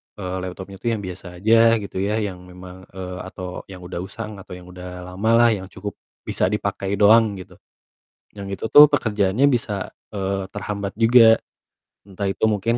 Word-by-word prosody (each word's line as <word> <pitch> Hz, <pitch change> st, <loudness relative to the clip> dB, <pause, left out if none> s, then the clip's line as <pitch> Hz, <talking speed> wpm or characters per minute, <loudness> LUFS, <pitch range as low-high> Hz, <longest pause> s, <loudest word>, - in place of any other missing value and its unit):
eee, 95 Hz, -2 st, -5 dB
laptopnya 95 Hz, +1 st, -8 dB
itu 120 Hz, -, -5 dB
yang 105 Hz, -, -5 dB
biasa 95 Hz, +1 st, -8 dB, 0.2 s
aja 115 Hz, +1 st, +5 dB
gitu 100 Hz, -3 st, -5 dB
ya, 100 Hz, +2 st, 0 dB
yang 95 Hz, -3 st, -5 dB
memang 90 Hz, +1 st, -12 dB
eee, 90 Hz, 0 st, -7 dB
atau 90 Hz, -1 st, -8 dB
yang 90 Hz, -2 st, -11 dB
udah 90 Hz, -1 st, -6 dB
usang, 105 Hz, +2 st, -7 dB
atau 90 Hz, -, -10 dB
yang 90 Hz, -, -11 dB
udah 90 Hz, 0 st, -9 dB
lamalah 110 Hz, +6 st, +3 dB
yang 95 Hz, -3 st, -3 dB
cukup 100 Hz, +1 st, -7 dB, 0.3 s
bisa -, -, 0 dB
dipakai 100 Hz, -1 st, -2 dB
doang, 105 Hz, +1 st, +5 dB
gitu. 95 Hz, -, -12 dB, 0.8 s
Yang 100 Hz, -1 st, -6 dB
itu -, -, -4 dB
tuh 145 Hz, +4 st, +10 dB
pekerjaannya 105 Hz, -1 st, +2 dB
bisa, 115 Hz, -7 st, -2 dB, 0.2 s
eee, 95 Hz, -1 st, -2 dB
terhambat 100 Hz, -1 st, -4 dB
juga. 115 Hz, -1 st, +6 dB, 0.7 s
Entah 100 Hz, 0 st, -4 dB
itu 95 Hz, -, -5 dB
mungkin 110 Hz, +2 st, +1 dB
100 Hz, 170 wpm, -22 LUFS, 95-110 Hz, 0.8 s, tuh